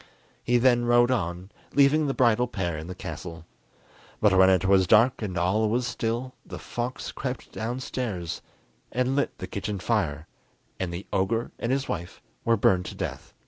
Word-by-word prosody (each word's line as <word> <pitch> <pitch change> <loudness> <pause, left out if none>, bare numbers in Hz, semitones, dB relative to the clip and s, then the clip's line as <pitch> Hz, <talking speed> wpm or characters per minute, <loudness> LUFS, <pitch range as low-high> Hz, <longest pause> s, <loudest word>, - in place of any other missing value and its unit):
He 120 +1 +3
then 120 -1 +4
rode 120 +1 +4
on, 90 -4 -2 0.2
leaving 145 +2 +5
the 135 - -1
bridal 120 -2 +3
pair 85 -8 -2
in 80 +1 -6
the 90 - -6
castle. 85 -3 -7 0.7
But 105 -3 +4
when 95 0 +7
it 95 0 +3
was 95 -1 +4
dark 115 +7 +5
and 95 -4 -3
all 105 +5 +2
was 120 +3 +1
still, 120 +1 -2
the - - -8
fox 120 +2 -4
crept 130 -1 -5
downstairs 115 -7 -4 0.5
and 125 +2 0
lit 140 - 0
the - - -5
kitchen 100 0 -4
fire, 85 -7 -1 0.5
and 95 -2 -2
the 85 +3 -6
ogre 115 +5 0
and 120 - -1
his 135 +1 0
wife 85 +1 -5 0.2
were 115 0 +3
burned 90 -2 +3
to - - -7
death. - - -6
110 Hz, 175 wpm, -26 LUFS, 95-125 Hz, 0.7 s, when